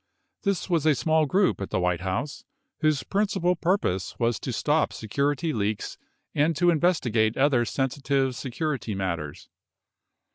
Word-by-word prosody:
This 200 Hz, -3 st, -1 dB
was 165 Hz, -4 st, +1 dB
a 155 Hz, -, +5 dB
small 160 Hz, +1 st, +2 dB
group 185 Hz, -, +2 dB
at 100 Hz, -, -4 dB
the -, -, 0 dB
White 90 Hz, -1 st, 0 dB
House 115 Hz, +10 st, -3 dB, 0.4 s
whose 155 Hz, -3 st, +1 dB
principal 195 Hz, -3 st, +1 dB
purpose 165 Hz, -, -1 dB
was 115 Hz, -2 st, 0 dB
to 130 Hz, -, -4 dB
stop 150 Hz, +6 st, +1 dB
security 145 Hz, +8 st, -1 dB
leaks 105 Hz, -2 st, -2 dB, 0.3 s
and 155 Hz, +3 st, +2 dB
to 175 Hz, +4 st, +4 dB
investigate 125 Hz, -10 st, +1 dB
other 135 Hz, -3 st, +3 dB
sensitive 135 Hz, 0 st, 0 dB
security 130 Hz, -5 st, -3 dB
matters. 85 Hz, -6 st, -4 dB
140 Hz, 140 wpm, -26 LUFS, 110-160 Hz, 0.4 s, a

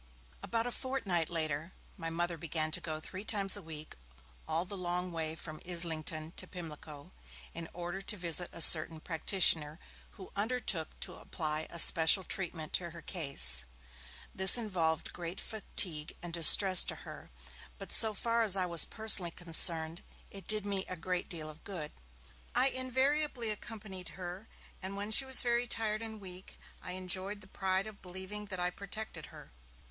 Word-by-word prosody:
About 230 Hz, 0 st, -2 dB
a 245 Hz, -, -4 dB
fortnight 225 Hz, -, -2 dB
later, 160 Hz, 0 st, -3 dB, 0.2 s
my 165 Hz, -, -6 dB
Mother 175 Hz, +1 st, -3 dB
began 155 Hz, 0 st, -3 dB
to 175 Hz, -, +1 dB
go 155 Hz, -2 st, -5 dB
three 185 Hz, +5 st, -9 dB
times 200 Hz, -3 st, +3 dB
a 205 Hz, -, -7 dB
week 155 Hz, -2 st, -9 dB, 0.5 s
all 160 Hz, +3 st, -1 dB
the 200 Hz, -, -8 dB
long 180 Hz, 0 st, -4 dB
way 160 Hz, -1 st, -4 dB
from 155 Hz, -1 st, -10 dB
Islington 160 Hz, -2 st, -3 dB
to -, -, -1 dB
Pimlico, 155 Hz, -4 st, -11 dB, 0.4 s
in 165 Hz, -1 st, -7 dB
order 175 Hz, +2 st, -6 dB
to 210 Hz, +2 st, -3 dB
visit 175 Hz, 0 st, -2 dB
a 170 Hz, -, -7 dB
certain 160 Hz, 0 st, +8 dB
practitioner, 160 Hz, -2 st, 0 dB, 0.3 s
who 190 Hz, -3 st, -12 dB
undertook 210 Hz, -6 st, -3 dB
to -, -, -4 dB
apply 155 Hz, -1 st, -5 dB
a 170 Hz, -, -8 dB
special 165 Hz, +3 st, +6 dB
treatment 170 Hz, -5 st, -3 dB
to 175 Hz, -2 st, -1 dB
her 170 Hz, 0 st, -12 dB
case. 140 Hz, -, 0 dB, 0.7 s
This 190 Hz, +4 st, +7 dB
involved 170 Hz, -8 st, -2 dB
great 175 Hz, +1 st, -7 dB
fatigue 175 Hz, -7 st, -2 dB
and 175 Hz, -1 st, -8 dB
distress 185 Hz, +3 st, +9 dB
to -, -, -2 dB
her, -, -, -11 dB, 0.5 s
but -, -, -10 dB
so 220 Hz, -1 st, +3 dB
far 230 Hz, +3 st, -1 dB
as 205 Hz, -4 st, +6 dB
I 185 Hz, -, 0 dB
was 170 Hz, -3 st, +5 dB
personally 215 Hz, -5 st, 0 dB
concerned 165 Hz, -1 st, -1 dB, 0.3 s
it 195 Hz, -3 st, -11 dB
did 215 Hz, -1 st, +3 dB
me 200 Hz, -2 st, -3 dB
a 185 Hz, -, -5 dB
great 180 Hz, +1 st, -4 dB
deal 160 Hz, -3 st, -5 dB
of 155 Hz, +1 st, -12 dB
good. 170 Hz, -7 st, -6 dB, 0.6 s
I 255 Hz, +2 st, +3 dB
invariably 260 Hz, -1 st, -1 dB
accompanied 210 Hz, -3 st, -8 dB
her, 185 Hz, +3 st, -8 dB, 0.3 s
and 195 Hz, +1 st, -7 dB
when 205 Hz, +2 st, -5 dB
she 265 Hz, +5 st, +7 dB
was 265 Hz, -1 st, +10 dB
very 240 Hz, 0 st, 0 dB
tired 215 Hz, -2 st, -1 dB
and 220 Hz, -1 st, -8 dB
weak, 185 Hz, -1 st, -12 dB, 0.2 s
I 180 Hz, -, -7 dB
enjoyed 185 Hz, +2 st, 0 dB
the 190 Hz, -, -11 dB
pride 190 Hz, 0 st, -2 dB
of 215 Hz, -2 st, -12 dB
believing 190 Hz, +3 st, -8 dB
that 190 Hz, -3 st, -6 dB
I 180 Hz, 0 st, -1 dB
protected 205 Hz, +3 st, -7 dB
her. -, -, -15 dB
180 Hz, 170 wpm, -31 LUFS, 165-205 Hz, 0.7 s, was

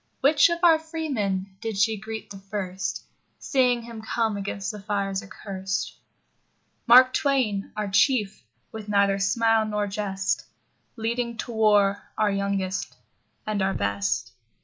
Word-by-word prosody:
Which 295 Hz, +4 st, +5 dB
of 340 Hz, -, 0 dB
our 330 Hz, -2 st, +6 dB
freemen 215 Hz, -, -3 dB
did 225 Hz, -3 st, -3 dB
she 220 Hz, +2 st, +3 dB
greet 220 Hz, +1 st, -7 dB
the 195 Hz, -, -8 dB
first, 195 Hz, -1 st, -4 dB, 0.3 s
Seeing 250 Hz, -3 st, +1 dB
him 230 Hz, -1 st, -9 dB
come 220 Hz, -1 st, -1 dB
against 200 Hz, -1 st, -4 dB
the 210 Hz, -1 st, -9 dB
fires 195 Hz, -1 st, -2 dB
accurst? 190 Hz, -1 st, -5 dB, 0.9 s
Mark 255 Hz, +2 st, +8 dB
Twain, 250 Hz, -9 st, 0 dB
our 210 Hz, -1 st, -1 dB
Chief, 210 Hz, 0 st, +2 dB, 0.3 s
with 215 Hz, -1 st, -8 dB
neither 200 Hz, -1 st, +3 dB
smile 225 Hz, +2 st, +2 dB
nor 210 Hz, -1 st, -1 dB
jest, 195 Hz, -1 st, -2 dB, 0.5 s
Leading 235 Hz, +1 st, -2 dB
to 240 Hz, -, -5 dB
war 205 Hz, -3 st, +3 dB, 0.2 s
our 210 Hz, -1 st, +2 dB
youngest 195 Hz, -1 st, -2 dB, 0.5 s
and 215 Hz, -2 st, -1 dB
our 190 Hz, 0 st, 0 dB
best. 100 Hz, +4 st, -1 dB
210 Hz, 135 wpm, -25 LUFS, 195-230 Hz, 0.9 s, Mark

